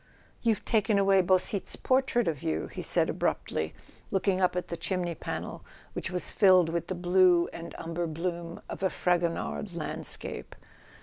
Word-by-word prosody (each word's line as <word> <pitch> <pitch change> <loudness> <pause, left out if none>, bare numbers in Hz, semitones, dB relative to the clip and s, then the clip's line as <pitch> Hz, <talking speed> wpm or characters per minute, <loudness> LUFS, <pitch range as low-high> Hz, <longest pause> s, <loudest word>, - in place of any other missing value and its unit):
"You've 220 -4 +1
taken 220 -2 +2
away 195 -1 +5
Beausite's 185 +2 +1
portrait 260 -2 +2
of 155 -5 -1
you," 80 0 -1
he - - -7
said - - +2
abruptly, 80 0 -1 0.3
looking 190 -1 +1
up 180 -1 +2
at 180 - -3
the 170 - -2
chimney 175 0 -2
panel, - - -5 0.3
which - - -3
was 180 0 -2
filled 185 -4 +5
with 170 0 -2
the 185 - -3
blue 175 -1 +4
and 170 - -8
umber 170 +1 -3
bloom 170 +1 -4
of - - -7
a 190 - +2
Fragonard 170 - -1
landscape. - - -3
180 Hz, 160 wpm, -29 LUFS, 170-195 Hz, 0.3 s, away